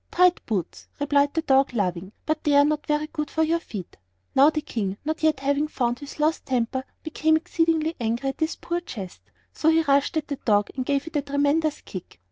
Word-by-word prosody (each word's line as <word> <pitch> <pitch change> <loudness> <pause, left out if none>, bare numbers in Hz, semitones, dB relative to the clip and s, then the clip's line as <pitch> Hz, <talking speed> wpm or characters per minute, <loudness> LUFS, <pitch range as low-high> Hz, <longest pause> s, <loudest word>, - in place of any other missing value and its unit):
"Tight 360 0 +3
boots," 195 -7 -3
replied 285 0 +2
the 325 - +1
dog, 270 -3 +3
laughing; 185 -2 -1
"but 310 0 -1
they 295 -1 +3
are 285 0 +7
not 300 0 -1
very 300 0 +1
good 300 -1 -4
for 320 - +1
your 330 +2 +1
feet." 200 - -8 0.4
Now 275 +3 +7
the 310 - -1
King, 200 -9 -3
not 315 +1 -2
yet 310 -3 +2
having 285 +2 +1
found 245 -5 -1
his 285 +1 -10
lost 310 +2 +1
temper, 260 0 -1 0.2
became 315 0 +2
exceedingly 325 0 0
angry 235 +3 -1
at 270 - -6
this 315 +1 0
poor 345 0 -3
jest; 200 - -8 0.3
so 320 - +2
he 325 0 +4
rushed 280 +2 +2
at 310 - -2
the 285 - -3
dog 205 -4 +1
and 255 -2 -3
gave 280 -1 +1
it 325 -2 -3
a - - +1
tremendous 285 +2 +1
kick. 180 - -9
285 Hz, 215 wpm, -25 LUFS, 255-315 Hz, 0.4 s, are